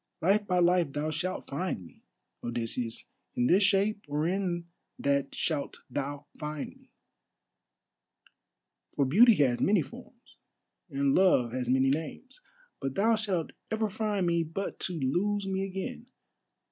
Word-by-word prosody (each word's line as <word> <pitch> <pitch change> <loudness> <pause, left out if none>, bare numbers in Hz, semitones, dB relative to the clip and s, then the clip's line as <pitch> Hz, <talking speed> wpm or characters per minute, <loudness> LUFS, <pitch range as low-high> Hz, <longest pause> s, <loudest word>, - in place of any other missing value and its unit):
"Life 205 +4 +2
by 180 - +2
life 175 -4 +3
thou 150 +1 -1
shalt 185 +4 -3
find 140 - -3
me, - - -17 0.4
Odysseus, 120 0 -3 0.3
in 120 - +2
this 185 +10 +5
shape 205 +1 +2
or 150 +2 0
in 180 -2 -1 0.3
that 140 -1 0
shalt 150 -4 -2
thou 145 +2 -3
find 150 -1 -5
me—for - - -11
beauty 220 - +7
has 130 -6 +2
many 195 -4 +4
forms, - - -14 0.5
and 140 0 +1
love 160 -11 +4
has 125 0 -2
many 130 +1 +4
names—but 260 - -6
thou 225 +3 +4
shalt 195 -7 -1 0.2
ever 220 -1 0
find 210 -2 0
me 170 -1 +2
but 165 +5 -4
to 180 - -1
lose 195 +10 0
me 190 0 -1
again. 195 +6 -5
170 Hz, 135 wpm, -29 LUFS, 140-200 Hz, 0.5 s, beauty